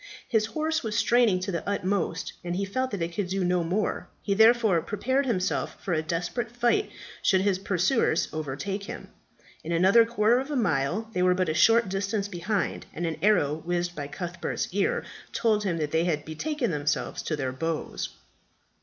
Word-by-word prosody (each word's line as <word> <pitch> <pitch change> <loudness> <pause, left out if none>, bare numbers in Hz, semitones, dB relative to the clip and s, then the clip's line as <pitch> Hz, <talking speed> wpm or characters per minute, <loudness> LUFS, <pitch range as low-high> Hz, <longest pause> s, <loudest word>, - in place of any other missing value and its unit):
His 220 -2 +2
horse 315 +7 -1
was 215 -2 -2
straining 230 -5 +4
to 195 +2 -2
the 170 +2 -3
utmost, 190 -4 -1
and 175 0 -3
he 200 +2 -1
felt 255 +6 -1
that 200 -7 -3
it 170 +1 -4
could 200 +1 -2
do 190 +1 -1
no 180 -1 +2
more; 190 +6 -1 0.2
he 200 - +1
therefore 220 -4 +5
prepared 260 - 0
himself 185 -6 -1
for 180 - -2
a 155 - +1
desperate 175 +9 -2
fight 240 - +1 0.3
should 190 -2 +3
his 195 -1 +1
pursuers 190 0 +1
overtake 155 +7 -4
him. - - -8 0.5
In 165 - -5
another 190 +7 +6
quarter 230 +1 +3
of 270 +2 -5
a 295 - -2
mile 180 - 0
they 180 - 0
were 180 0 +4
but 185 -2 0
a - - +1
short 225 +7 +5
distance 195 +2 -1
behind, 195 0 -2
and 170 - -2
an 165 -2 -2
arrow 160 -7 +2
whizzing 175 0 -1
by 145 -4 -5
Cuthbert's 170 +4 -4
ear 200 0 +1 0.3
told 215 -2 +2
him 175 -4 0
they 160 +2 0
had 150 -4 -1
be 155 - -6
taken 290 - -1
themselves 145 -1 -1
to 155 - -2
their 135 -3 -2
bows. 160 +5 -3
190 Hz, 190 wpm, -27 LUFS, 165-220 Hz, 0.5 s, another